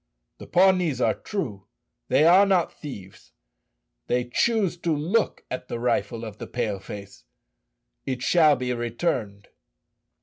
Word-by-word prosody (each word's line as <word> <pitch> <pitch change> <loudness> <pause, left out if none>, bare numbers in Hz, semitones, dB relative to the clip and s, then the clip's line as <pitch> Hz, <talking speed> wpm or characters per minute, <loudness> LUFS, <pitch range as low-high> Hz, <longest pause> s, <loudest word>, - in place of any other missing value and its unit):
"The - - -10
Pawnees 180 -6 +3
are - - +2
true; 115 - -5 0.4
they 155 - +4
are 180 +4 +7
not 185 -3 +2
thieves. 100 -11 -11 0.7
They 125 0 +1
choose 200 - +1
to 170 -1 -2
look 175 +10 0
at 125 0 -5
the - - -4
rifle 115 -1 -1
of 110 -1 -9
the - - -6
Pale 110 -5 -2
face. 100 -7 -10 0.8
It 130 -1 -3
shall 155 -2 +5
be 125 -1 -2
returned." 115 -4 -3
125 Hz, 135 wpm, -25 LUFS, 110-175 Hz, 0.8 s, are